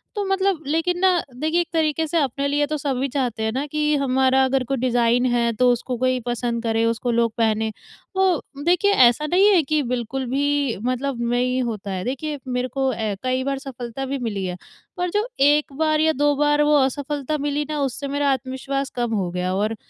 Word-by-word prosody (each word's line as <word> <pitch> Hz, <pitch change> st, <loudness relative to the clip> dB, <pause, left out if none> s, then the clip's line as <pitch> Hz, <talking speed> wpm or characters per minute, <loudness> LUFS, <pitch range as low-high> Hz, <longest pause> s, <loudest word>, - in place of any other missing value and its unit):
तो 410 Hz, -, -1 dB
मतलब 385 Hz, -4 st, 0 dB
लेकिन 330 Hz, +4 st, 0 dB
ना, 365 Hz, -2 st, +3 dB
देखिए, 315 Hz, +6 st, 0 dB
एक 340 Hz, -, -4 dB
तरीके 320 Hz, 0 st, +1 dB
से 335 Hz, -, -1 dB
अपने 280 Hz, -1 st, 0 dB
लिए 290 Hz, +1 st, +1 dB
तो 305 Hz, 0 st, -2 dB
सभी 275 Hz, -1 st, -1 dB
चाहते 245 Hz, -5 st, -2 dB
हैं 220 Hz, -, 0 dB
ना 275 Hz, +3 st, -1 dB
कि, 300 Hz, 0 st, 0 dB
हमारा 265 Hz, -1 st, +2 dB
अगर 260 Hz, 0 st, +1 dB
कोई 270 Hz, -, +1 dB
डिज़ाइन 245 Hz, 0 st, +2 dB
है, 240 Hz, -1 st, +2 dB
तो 250 Hz, +2 st, +3 dB
उसको 245 Hz, +1 st, -2 dB
कोई 255 Hz, +1 st, +1 dB
पसंद 240 Hz, -1 st, -2 dB
करे, 225 Hz, 0 st, +1 dB
उसको 230 Hz, +1 st, 0 dB
लोग 230 Hz, -1 st, +2 dB
पहनें। 220 Hz, -1 st, +1 dB, 0.4 s
तो 360 Hz, -7 st, 0 dB
देखिए, 360 Hz, +4 st, +3 dB
ऐसा 255 Hz, -2 st, +5 dB
नहीं 375 Hz, +5 st, +4 dB
है 345 Hz, -, +5 dB
कि 305 Hz, +2 st, 0 dB
बिल्कुल 250 Hz, +2 st, -3 dB
भी 285 Hz, -3 st, 0 dB
मतलब 255 Hz, 0 st, -2 dB
नहीं 250 Hz, +1 st, +1 dB
होता 210 Hz, -4 st, -4 dB
है। 185 Hz, -1 st, -3 dB
देखिए, 290 Hz, +3 st, -3 dB
मेरे 250 Hz, 0 st, -1 dB
को 265 Hz, +1 st, -1 dB
ए 215 Hz, -2 st, -2 dB
कई 255 Hz, 0 st, 0 dB
बार 275 Hz, 0 st, -2 dB
सफलता 265 Hz, -1 st, -6 dB
भी 275 Hz, +1 st, -3 dB
मिली 205 Hz, -6 st, -3 dB
है, 180 Hz, -1 st, -4 dB, 0.4 s
पर 360 Hz, 0 st, -1 dB
जो 420 Hz, +5 st, 0 dB
एक 290 Hz, 0 st, +3 dB
बार 310 Hz, -1 st, +2 dB
या 315 Hz, 0 st, +4 dB
दो 290 Hz, +1 st, +2 dB
बार 295 Hz, +1 st, +2 dB
वो 300 Hz, 0 st, +4 dB
असफलता 285 Hz, +2 st, -1 dB
मिली 290 Hz, +1 st, -1 dB
ना, 300 Hz, -1 st, -2 dB
उससे 275 Hz, +1 st, -2 dB
मेरा 285 Hz, 0 st, 0 dB
आत्मविश्वास 265 Hz, +1 st, -3 dB
कम 240 Hz, -2 st, -1 dB
हो 185 Hz, -3 st, -1 dB
गया 180 Hz, +1 st, -2 dB
और 215 Hz, +3 st, 0 dB
270 Hz, 210 wpm, -22 LUFS, 240-295 Hz, 0.4 s, ऐसा